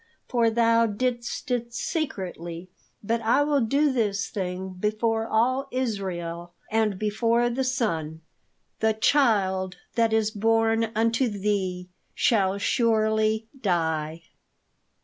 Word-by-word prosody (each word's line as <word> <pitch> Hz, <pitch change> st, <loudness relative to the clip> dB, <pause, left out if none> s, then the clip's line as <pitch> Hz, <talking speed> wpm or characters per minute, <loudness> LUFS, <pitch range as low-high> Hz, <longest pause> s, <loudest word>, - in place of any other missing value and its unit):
'For 235 Hz, -2 st, +2 dB
thou 230 Hz, 0 st, +3 dB
didst 240 Hz, +3 st, -3 dB
it 235 Hz, -1 st, -2 dB
secretly, 185 Hz, -, -4 dB, 0.3 s
but 230 Hz, +3 st, 0 dB
I 235 Hz, +6 st, +3 dB
will 290 Hz, -2 st, +2 dB
do 280 Hz, +6 st, +2 dB
this 205 Hz, -5 st, -1 dB
thing 185 Hz, -1 st, -4 dB
before 225 Hz, +2 st, 0 dB
all 255 Hz, +5 st, +1 dB
Israel, 175 Hz, -8 st, -3 dB, 0.2 s
and 220 Hz, -3 st, +1 dB
before 230 Hz, +3 st, +1 dB
the 265 Hz, +3 st, -1 dB
sun; 165 Hz, -11 st, -2 dB, 0.6 s
THE 220 Hz, 0 st, +2 dB
CHILD 195 Hz, -8 st, +2 dB, 0.2 s
THAT 230 Hz, -1 st, +2 dB
IS 220 Hz, -1 st, +2 dB
BORN 225 Hz, +1 st, +1 dB
UNTO 230 Hz, +3 st, +2 dB
THEE 195 Hz, -3 st, -2 dB, 0.3 s
SHALL 195 Hz, -4 st, +2 dB
SURELY 220 Hz, 0 st, +1 dB, 0.2 s
DIE.'" 160 Hz, -4 st, -1 dB
220 Hz, 110 wpm, -25 LUFS, 190-235 Hz, 0.6 s, thou